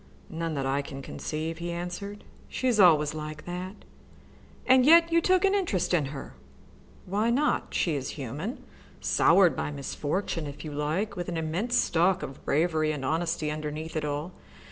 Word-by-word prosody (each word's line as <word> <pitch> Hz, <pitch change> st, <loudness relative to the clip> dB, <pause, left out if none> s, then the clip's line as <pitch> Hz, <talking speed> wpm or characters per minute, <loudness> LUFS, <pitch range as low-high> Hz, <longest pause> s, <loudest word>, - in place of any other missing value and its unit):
"None 165 Hz, -1 st, -3 dB
that 135 Hz, -1 st, -2 dB
I 135 Hz, +1 st, +1 dB
can 135 Hz, -1 st, -8 dB
conceive," 160 Hz, +4 st, -4 dB
he 170 Hz, 0 st, -4 dB
answered. 180 Hz, +4 st, -5 dB, 0.3 s
"She 260 Hz, -, -2 dB
is 235 Hz, -4 st, +2 dB
always 155 Hz, -6 st, +6 dB
like 155 Hz, 0 st, -7 dB
that." 180 Hz, +3 st, -6 dB, 0.8 s
"And 260 Hz, 0 st, +6 dB
yet 335 Hz, +4 st, +7 dB
you 335 Hz, 0 st, +4 dB
took 370 Hz, +2 st, +3 dB
an 390 Hz, -, +3 dB
interest 205 Hz, -, 0 dB
in 160 Hz, -5 st, +3 dB
her!" 135 Hz, 0 st, -7 dB, 0.7 s
"Why 210 Hz, +5 st, 0 dB
not? 280 Hz, +6 st, 0 dB
She 170 Hz, -, +1 dB
is 140 Hz, -3 st, -3 dB
human, 145 Hz, -, -5 dB, 0.4 s
soured 190 Hz, -4 st, +4 dB
by -, -, -2 dB
misfortune, 150 Hz, +3 st, -3 dB
if 145 Hz, +3 st, -8 dB
you 155 Hz, -, -5 dB
like, 155 Hz, +9 st, -2 dB
with 175 Hz, -1 st, -4 dB
an 170 Hz, -, -3 dB
immense 175 Hz, +10 st, -1 dB
stock 180 Hz, -4 st, +2 dB
of 135 Hz, -2 st, -8 dB
bravery 155 Hz, 0 st, +1 dB
and 145 Hz, -3 st, -4 dB
honesty 165 Hz, 0 st, -1 dB
underneath 155 Hz, +1 st, -5 dB
it 155 Hz, -, -1 dB
all. 150 Hz, +4 st, -3 dB
165 Hz, 170 wpm, -28 LUFS, 150-200 Hz, 0.8 s, yet